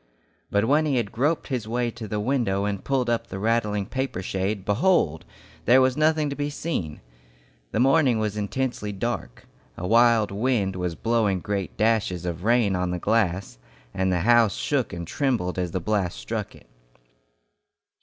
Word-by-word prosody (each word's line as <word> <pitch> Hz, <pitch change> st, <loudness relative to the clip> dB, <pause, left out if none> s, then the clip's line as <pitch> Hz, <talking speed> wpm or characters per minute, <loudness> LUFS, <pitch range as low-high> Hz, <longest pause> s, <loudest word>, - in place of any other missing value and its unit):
But 100 Hz, +1 st, +2 dB
when 150 Hz, +5 st, +3 dB
he 140 Hz, -, +1 dB
had 115 Hz, -5 st, -1 dB
groped 145 Hz, +7 st, 0 dB
his 125 Hz, -5 st, -2 dB
way 120 Hz, +1 st, -1 dB
to 110 Hz, -1 st, -8 dB
the 105 Hz, +1 st, -2 dB
window 105 Hz, -4 st, 0 dB
and 100 Hz, -2 st, -3 dB
pulled 135 Hz, -3 st, 0 dB
up 115 Hz, -1 st, 0 dB
the -, -, -6 dB
rattling 105 Hz, -1 st, 0 dB
paper 130 Hz, -6 st, -3 dB
shade, 95 Hz, +1 st, -2 dB
behold! 105 Hz, -, +2 dB, 0.4 s
there 125 Hz, +3 st, +6 dB
was 130 Hz, -1 st, +3 dB
nothing 155 Hz, 0 st, +2 dB
to -, -, -3 dB
be 145 Hz, 0 st, -2 dB
seen! 140 Hz, -, -4 dB, 0.7 s
The -, -, -1 dB
morning 135 Hz, -1 st, +4 dB
was 105 Hz, -1 st, -1 dB
intensely 105 Hz, +1 st, -2 dB
dark. 105 Hz, -, -4 dB, 0.3 s
A 90 Hz, -, -5 dB
wild 115 Hz, 0 st, +4 dB
wind 105 Hz, -3 st, 0 dB
was 90 Hz, -2 st, -3 dB
blowing 110 Hz, -4 st, +1 dB
great 100 Hz, +1 st, -4 dB
dashes 105 Hz, -6 st, +1 dB
of 85 Hz, 0 st, -4 dB
rain 115 Hz, -3 st, +3 dB
on 90 Hz, 0 st, -1 dB
the 90 Hz, -, -2 dB
glass, 95 Hz, -, 0 dB, 0.3 s
and 95 Hz, 0 st, 0 dB
the 90 Hz, -1 st, +1 dB
house 115 Hz, -1 st, +4 dB
shook 140 Hz, -4 st, -1 dB
and 85 Hz, 0 st, -5 dB
trembled 110 Hz, -, -1 dB
as 90 Hz, -1 st, -1 dB
the 90 Hz, -, -2 dB
blasts 95 Hz, -, -1 dB
struck -, -, -4 dB
it. -, -, -18 dB
110 Hz, 175 wpm, -25 LUFS, 95-125 Hz, 0.7 s, there